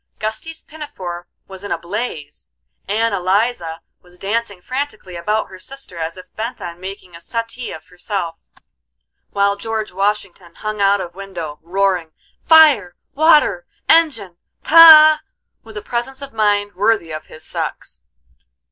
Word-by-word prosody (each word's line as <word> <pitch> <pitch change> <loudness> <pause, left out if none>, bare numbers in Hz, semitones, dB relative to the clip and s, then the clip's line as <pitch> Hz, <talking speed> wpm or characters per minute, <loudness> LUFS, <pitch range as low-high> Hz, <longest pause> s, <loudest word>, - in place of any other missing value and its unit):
Gusty's 270 +10 -5
pinafore 195 - -8 0.2
was 190 0 -11
in 205 - -6
a - - 0
blaze; 170 - -6 0.4
Ann 220 +2 0
Eliza 185 -3 0 0.2
was 180 0 -20
dancing 205 0 -3
frantically 235 -5 -5
about 210 +6 -1
her 185 - -12
sister 265 -6 -11
as 165 +2 -4
if 185 - -14
bent 230 +3 -5
on 170 0 -7
making 185 -1 -9
a 170 - -12
suttee 230 +5 -5
of 160 - -10
herself, 180 -2 -5 0.8
while 200 0 +1
George 220 +1 -4
Washington 190 -3 -3
hung 215 -1 -4
out 200 0 +3
of 175 -1 -7
window, 175 -6 -7
roaring, 180 -1 -1 0.3
"Fire!" 295 - +6 0.2
"water!" 315 - +3 0.2
"engine!" 245 - +2 0.3
"pa!" 310 -1 +9 0.4
with 220 -1 -11
a 210 - -6
presence 260 +4 -4
of 275 - -9
mind 205 -2 +1
worthy 200 -3 +1
of 155 0 -7
his 155 0 -13
sex. - - -5
200 Hz, 140 wpm, -18 LUFS, 175-235 Hz, 0.8 s, pa